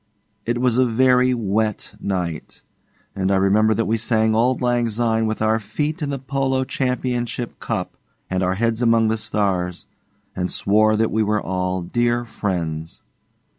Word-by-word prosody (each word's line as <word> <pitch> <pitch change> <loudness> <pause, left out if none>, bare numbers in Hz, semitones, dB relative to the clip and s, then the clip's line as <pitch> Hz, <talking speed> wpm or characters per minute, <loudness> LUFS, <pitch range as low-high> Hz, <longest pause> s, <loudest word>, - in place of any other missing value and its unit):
It 120 +1 0
was 125 -1 +2
a 130 - +5
very 125 +2 +3
wet 110 -2 -1
night, 90 -5 -4 0.5
and 95 0 0
I - - +3
remember 105 +3 +3
that 115 - 0
we 115 - +1
sang 110 -1 +2
'Auld 120 +3 +2
Lang 120 -1 +1
Syne' 115 0 +1
with 110 0 -2
our 110 +1 +2
feet 150 - -3
in 145 - -2
the 140 - -2
Polo 135 0 -1
Championship 125 -2 -2
Cup, - - -3 0.3
and 95 0 -1
our 95 0 +1
heads 115 +2 0
among 115 -2 +3
the 110 - +1
stars, 95 -5 -1 0.5
and 90 0 -2
swore 110 +2 +3
that 110 +1 +1
we 110 - +1
were 105 0 +1
all 90 -1 -2
dear 120 +5 0
friends. 85 -8 -4
110 Hz, 165 wpm, -21 LUFS, 100-120 Hz, 0.5 s, a